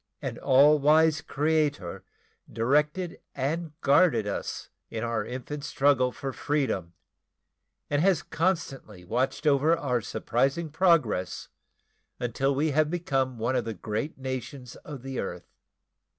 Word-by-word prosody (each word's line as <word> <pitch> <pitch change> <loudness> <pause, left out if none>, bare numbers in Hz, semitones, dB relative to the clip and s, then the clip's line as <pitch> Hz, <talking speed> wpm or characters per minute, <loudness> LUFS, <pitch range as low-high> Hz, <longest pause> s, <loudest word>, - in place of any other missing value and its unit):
An - - -5
all 145 +3 +5
wise 155 +1 +4
Creator 150 - -1 0.5
directed 150 +9 0 0.2
and 155 +3 -3
guarded 140 - +4
us 100 - -4 0.2
in 110 -1 -4
our 115 -1 -1
infant 130 +4 -6
struggle 135 -3 +2
for 135 0 -5
freedom 115 - -1 0.9
and 145 0 +1
has 185 -3 +3
constantly 135 - -2
watched 125 - -1
over 150 +3 +4
our 125 -7 -1
surprising 135 +9 -1
progress 155 - +1 0.7
until 135 +3 0
we 150 +3 +1
have 150 +1 +2
become 135 -7 -1
one 115 +4 -1
of 125 - +1
the 115 -1 -5
great 110 - -4
nations 130 -1 -6
of 145 -5 -9
the 135 -1 -4
earth. 90 -2 -6
140 Hz, 125 wpm, -27 LUFS, 120-150 Hz, 0.9 s, all